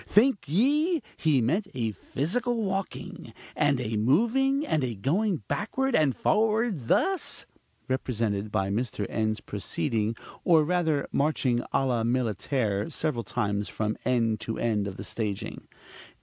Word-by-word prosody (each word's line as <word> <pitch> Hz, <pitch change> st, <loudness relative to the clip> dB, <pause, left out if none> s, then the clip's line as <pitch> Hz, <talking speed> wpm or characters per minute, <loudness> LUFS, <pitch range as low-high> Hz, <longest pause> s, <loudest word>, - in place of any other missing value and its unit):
Think 225 Hz, 0 st, +4 dB
ye 295 Hz, -, +2 dB
he 150 Hz, -5 st, +2 dB
meant 170 Hz, -, +1 dB
a 115 Hz, -3 st, 0 dB
physical 230 Hz, -, -1 dB
walking, 190 Hz, -, -4 dB, 0.2 s
and 145 Hz, -3 st, +2 dB
a 115 Hz, -3 st, -2 dB
moving, 235 Hz, -, +2 dB
and 155 Hz, -, +1 dB
a 120 Hz, -3 st, -2 dB
going 170 Hz, -, 0 dB
backward 265 Hz, +5 st, 0 dB
and 150 Hz, -5 st, +3 dB
forward 215 Hz, -, +1 dB
thus? 380 Hz, -, +1 dB, 0.4 s
(represented 115 Hz, -6 st, -1 dB
by 95 Hz, -2 st, 0 dB
Mr. 110 Hz, -1 st, -1 dB
N.'s 110 Hz, -1 st, -1 dB
proceeding, 110 Hz, +6 st, -2 dB, 0.3 s
or 160 Hz, -3 st, +5 dB
rather 160 Hz, -3 st, +1 dB
marching, 140 Hz, -4 st, +1 dB
à 135 Hz, -, +2 dB
la 120 Hz, -3 st, +1 dB
militaire, 115 Hz, -, 0 dB
several 150 Hz, -7 st, -1 dB
times 105 Hz, -4 st, -1 dB
from 110 Hz, 0 st, -2 dB
end 115 Hz, -3 st, +1 dB
to 110 Hz, 0 st, -4 dB
end 105 Hz, -3 st, 0 dB
of 95 Hz, -, -6 dB
the 100 Hz, -, -6 dB
staging). 105 Hz, -2 st, -4 dB
130 Hz, 135 wpm, -27 LUFS, -, 0.4 s, or